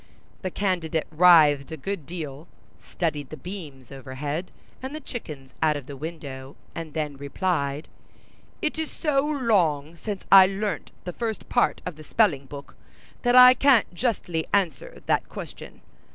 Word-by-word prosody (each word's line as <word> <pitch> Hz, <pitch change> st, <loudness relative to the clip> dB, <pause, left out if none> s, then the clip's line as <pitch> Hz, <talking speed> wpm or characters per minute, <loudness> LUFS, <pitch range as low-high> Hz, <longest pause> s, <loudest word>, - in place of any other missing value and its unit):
The 185 Hz, -, -2 dB
candidate 175 Hz, -5 st, -1 dB
writhed 155 Hz, -4 st, +6 dB
a 160 Hz, -, -5 dB
good 185 Hz, 0 st, -5 dB
deal, 155 Hz, -3 st, -7 dB, 0.4 s
studied 150 Hz, -5 st, -3 dB
the 155 Hz, -, -8 dB
beams 150 Hz, -10 st, -9 dB
overhead 145 Hz, +5 st, -5 dB, 0.3 s
and 265 Hz, +3 st, -6 dB
the -, -, -5 dB
chickens 150 Hz, -, -8 dB
out 155 Hz, -2 st, +3 dB
of 140 Hz, -, -9 dB
the 140 Hz, -, -8 dB
window, 140 Hz, -3 st, -8 dB, 0.2 s
and 160 Hz, -2 st, -7 dB
then 150 Hz, -3 st, -3 dB
replied, 140 Hz, 0 st, -2 dB, 0.8 s
"It 305 Hz, +1 st, -1 dB
is 320 Hz, -, -2 dB
so 280 Hz, -3 st, 0 dB
long 185 Hz, -, +1 dB
since 200 Hz, +3 st, -5 dB
I 190 Hz, -1 st, +10 dB
learnt 195 Hz, +1 st, -3 dB
the 180 Hz, -, -5 dB
first 225 Hz, -1 st, -4 dB
part -, -, +1 dB
of 180 Hz, -4 st, -5 dB
the 155 Hz, -, -11 dB
spelling 150 Hz, -8 st, +1 dB
book, 140 Hz, +1 st, -10 dB, 0.5 s
that 245 Hz, 0 st, +2 dB
I 250 Hz, 0 st, +10 dB
can't 255 Hz, -7 st, +3 dB
justly 175 Hz, -6 st, -2 dB
answer 185 Hz, -8 st, -1 dB
that -, -, 0 dB
question. -, -, -9 dB
165 Hz, 150 wpm, -25 LUFS, 145-200 Hz, 0.8 s, I